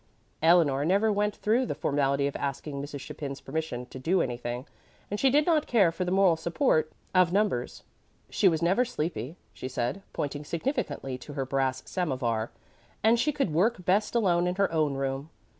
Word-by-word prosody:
Eleanor 160 -4 +4
never 200 +7 +3
went 210 0 0
through 230 +5 +1
the - - -2
formality 140 -1 +1
of 140 - -2
asking 140 0 -4
Mrs. 145 -1 -6
Chapin's 140 -1 -6
permission 135 -4 -4
to 130 - -10
do 175 +8 +1
anything, 120 -1 -3 0.5
and 205 - -2
she 270 - +4
did 295 +3 +3
not 315 -3 +2
care 200 -8 +4
for 180 +2 -3
the - - -1
moral 190 -3 +4
support 160 - +1 0.2
of 185 -2 +4
numbers. 195 - 0 0.4
She 200 - +2
was 165 -1 -1
never 190 +8 +3
sleepy, 160 - -4 0.2
she - - -6
said, 130 +8 -2
pointing 145 0 -3
significantly 160 - -3
to 145 - -10
her 135 -2 -2
brass 130 -1 -1
samovar, 130 - -1 0.5
and 225 +2 +4
she 285 +6 +2
could 270 - -1
work 185 +2 +1
best 205 +5 +2
alone 180 -6 +3
in 180 - -1
her 195 -1 +1
own 155 -4 +1
room. 135 +2 -3
160 Hz, 180 wpm, -28 LUFS, 135-195 Hz, 0.5 s, Eleanor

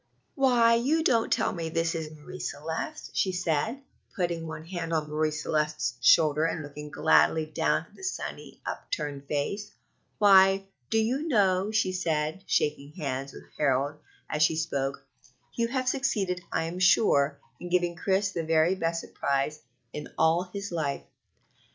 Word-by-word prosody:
"Why, 245 -5 +4
you 280 +8 +2
don't 230 -6 +2
tell - - +1
me 165 -2 -4
this 165 0 0
is 160 -2 -4
Marie 155 +4 -11
Celeste?" 160 - -5
she 190 - +1
said, 180 - -1 0.3
putting 170 -3 -2
one 160 0 -7
hand 170 -2 -4
on 155 -2 0
Marie 155 +1 0
Celeste's 150 -5 -1
shoulder 155 +4 +5
and 160 -1 -2
looking 150 +1 -8
gladly 160 +1 +3
down 155 - 0
at - - -23
the - - -15
sunny, 380 - -5
upturned 140 - -4
face. 200 +9 -2 0.5
"Why, 195 -1 +6 0.2
do 225 - +1
you 255 +8 0
know," 195 - +2
she 215 -4 +1
said, 160 -1 -1
shaking 145 -1 0
hands 140 -5 -4
with - - -11 0.2
Harold 140 +1 +1 0.3
as 150 - -2
she 155 +1 +4
spoke, 140 -4 -2 0.5
"you 230 -1 0
have 255 +1 -2
succeeded, 220 -10 0
I - - 0
am 170 +3 -4
sure, 145 -6 +4 0.2
in 175 - -7
giving 175 -1 +1
Chris 195 +3 +1
the 170 -3 -3
very 160 +2 +3
best 165 -3 -1
surprise 140 +2 -2 0.3
in 150 - -6
all 165 +3 +2
his 200 0 -5
life." 150 -5 -2
165 Hz, 155 wpm, -28 LUFS, 150-195 Hz, 0.5 s, Why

